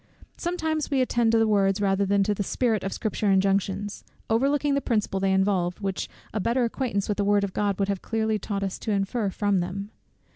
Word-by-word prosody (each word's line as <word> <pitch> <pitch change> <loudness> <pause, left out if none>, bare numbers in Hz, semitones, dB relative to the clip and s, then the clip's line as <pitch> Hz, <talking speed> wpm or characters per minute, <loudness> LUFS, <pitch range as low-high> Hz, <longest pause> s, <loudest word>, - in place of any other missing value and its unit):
Sometimes 320 -3 -2
we 275 - +1
attend 240 -3 +2
to 230 - +4
the 225 - +4
words 195 -2 +2
rather 200 0 +1
than 200 0 +3
to 210 +1 +1
the 205 - -3
spirit 220 +1 0
of 195 - -2
Scripture 215 -2 -1
injunctions, 195 +1 +1 0.3
overlooking 280 +5 +2
the 280 - +1
principle 210 -6 0
they 195 0 +1
involve, 190 -2 +1
which 195 -2 -3 0.2
a 215 - -1
better 235 +5 +1
acquaintance 230 -4 -1
with 210 - -1
the - - +3
word 205 0 +3
of 195 -2 -3
God 200 -2 0
would 195 - 0
have 200 -2 -2
clearly 220 -1 -1
taught 200 0 -3
us 195 -1 -3
to - - -5
infer 200 +2 0
from 200 0 +1
them. 195 +4 -4
205 Hz, 215 wpm, -26 LUFS, 195-225 Hz, 0.3 s, to